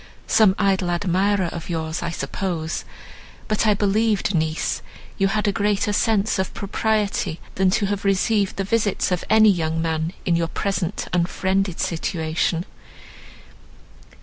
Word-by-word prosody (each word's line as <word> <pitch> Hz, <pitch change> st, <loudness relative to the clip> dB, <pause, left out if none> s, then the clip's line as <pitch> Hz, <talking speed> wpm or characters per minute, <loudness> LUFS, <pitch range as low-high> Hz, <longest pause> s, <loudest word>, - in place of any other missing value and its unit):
"Some 210 Hz, -4 st, +4 dB
idle 190 Hz, -2 st, +1 dB
admirer 190 Hz, +2 st, +1 dB
of 170 Hz, 0 st, -7 dB
yours 160 Hz, -1 st, -3 dB
I -, -, -2 dB
suppose; 165 Hz, +1 st, -3 dB, 0.6 s
but 215 Hz, +1 st, +1 dB
I 210 Hz, -, +4 dB
believed 205 Hz, 0 st, +1 dB
niece 160 Hz, -1 st, -1 dB, 0.4 s
you 195 Hz, -, +4 dB
had 210 Hz, +2 st, 0 dB
a -, -, +3 dB
greater 205 Hz, +1 st, 0 dB
sense 210 Hz, -1 st, +1 dB
of 190 Hz, -, -1 dB
propriety, 205 Hz, -4 st, -1 dB
than 190 Hz, -1 st, +2 dB
to 200 Hz, +2 st, +1 dB
have 200 Hz, 0 st, -2 dB
received 200 Hz, +1 st, +1 dB
the 195 Hz, -, -1 dB
visits 205 Hz, -1 st, 0 dB
of 180 Hz, -, 0 dB
any 220 Hz, -1 st, +6 dB
young 160 Hz, -3 st, -1 dB
man 160 Hz, +1 st, -1 dB
in 175 Hz, -, +2 dB
your 165 Hz, 0 st, +1 dB
present 195 Hz, +1 st, -2 dB
unfriended 190 Hz, +1 st, 0 dB
situation. 165 Hz, 0 st, -1 dB
190 Hz, 140 wpm, -22 LUFS, 170-205 Hz, 0.6 s, any